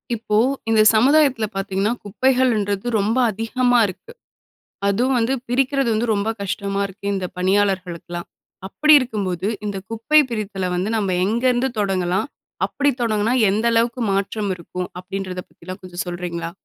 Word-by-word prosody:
இப்போ, 210 Hz, -1 st, -1 dB, 0.3 s
இந்த 220 Hz, -1 st, +4 dB
சமுதாயத்துல 265 Hz, -1 st, +4 dB
பார்த்தீங்கன்னா 195 Hz, +3 st, -1 dB
குப்பைகள்ன்றது 225 Hz, -3 st, +1 dB
ரொம்ப 215 Hz, +5 st, 0 dB
அதிகமா 245 Hz, +3 st, +1 dB
இருக்கு. 315 Hz, -, -10 dB, 0.8 s
அதுவும் 245 Hz, +6 st, +1 dB
வந்து 235 Hz, +3 st, +1 dB
பிரிக்கிறது 270 Hz, +1 st, +1 dB
வந்து 230 Hz, +2 st, 0 dB
ரொம்ப 200 Hz, +1 st, -1 dB
கஷ்டமா 200 Hz, 0 st, -2 dB
இருக்கு. 195 Hz, +1 st, -15 dB
இந்த 190 Hz, -2 st, -2 dB
பணியாளர்களுக்குலாம். 185 Hz, -3 st, -1 dB, 0.4 s
அப்டி 305 Hz, +10 st, +3 dB
இருக்கும்போது 200 Hz, -8 st, -3 dB, 0.2 s
இந்த 205 Hz, -1 st, -3 dB
குப்பை 230 Hz, +7 st, +3 dB
பிரித்தல 200 Hz, -4 st, -3 dB
வந்து 185 Hz, +4 st, -1 dB
நம்ம 195 Hz, -4 st, 0 dB
எங்கருந்து 245 Hz, +5 st, +1 dB
தொடங்கலாம், 190 Hz, +2 st, 0 dB, 0.4 s
அப்படி 285 Hz, 0 st, +1 dB
தொடங்கினா 220 Hz, 0 st, +1 dB, 0.2 s
எந்த 210 Hz, +3 st, 0 dB
அளவுக்கு 230 Hz, +2 st, +1 dB
மாற்றம் 200 Hz, +1 st, -1 dB
இருக்கும். 180 Hz, +1 st, -6 dB
அப்டின்றத 185 Hz, 0 st, -5 dB
பற்றிலாம் 185 Hz, +3 st, -10 dB
கொஞ்சம் 180 Hz, +1 st, -5 dB
சொல்றீங்களா? 175 Hz, -1 st, -4 dB
205 Hz, 130 wpm, -21 LUFS, 190-240 Hz, 0.8 s, இந்த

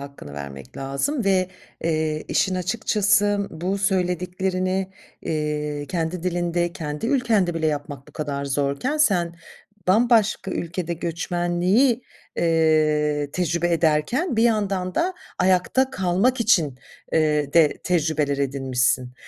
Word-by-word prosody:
hakkını 140 Hz, -, -10 dB
vermek 70 Hz, -2 st, -8 dB
lazım 140 Hz, -, -2 dB
ve, 190 Hz, -2 st, +2 dB, 0.4 s
eee, 155 Hz, -1 st, 0 dB
işin 190 Hz, -, +1 dB
açıkçası 205 Hz, +1 st, +1 dB
bu 180 Hz, +5 st, -2 dB
söylediklerini, 185 Hz, 0 st, -1 dB, 0.3 s
eee, 150 Hz, -1 st, -2 dB
kendi 170 Hz, 0 st, -2 dB
dilinde, 175 Hz, -1 st, -1 dB
kendi 150 Hz, +3 st, -4 dB
ülkende 225 Hz, -9 st, +2 dB
bile 160 Hz, -1 st, 0 dB
yapmak 145 Hz, -2 st, -4 dB
bu -, -, -17 dB
kadar 145 Hz, -2 st, -3 dB
zorken, 140 Hz, -, -1 dB
sen 175 Hz, -, +2 dB, 0.5 s
bambaşka 220 Hz, -1 st, +3 dB
ülkede 170 Hz, 0 st, -3 dB
göçmenliği, 175 Hz, -, +1 dB, 0.3 s
eee, 155 Hz, -3 st, +2 dB
tecrübe 175 Hz, -1 st, 0 dB
ederken 165 Hz, -, +1 dB
bir 225 Hz, -, +3 dB
yandan 200 Hz, -5 st, +1 dB
da 365 Hz, +2 st, 0 dB, 0.2 s
ayakta 185 Hz, +9 st, +2 dB
kalmak 195 Hz, +4 st, +1 dB
için 160 Hz, -, +2 dB, 0.3 s
eee, 150 Hz, -3 st, +1 dB
de 160 Hz, -3 st, +4 dB
tecrübeler 155 Hz, -5 st, +1 dB
edinmişsin. 130 Hz, -2 st, 0 dB
175 Hz, 110 wpm, -23 LUFS, 150-195 Hz, 0.5 s, de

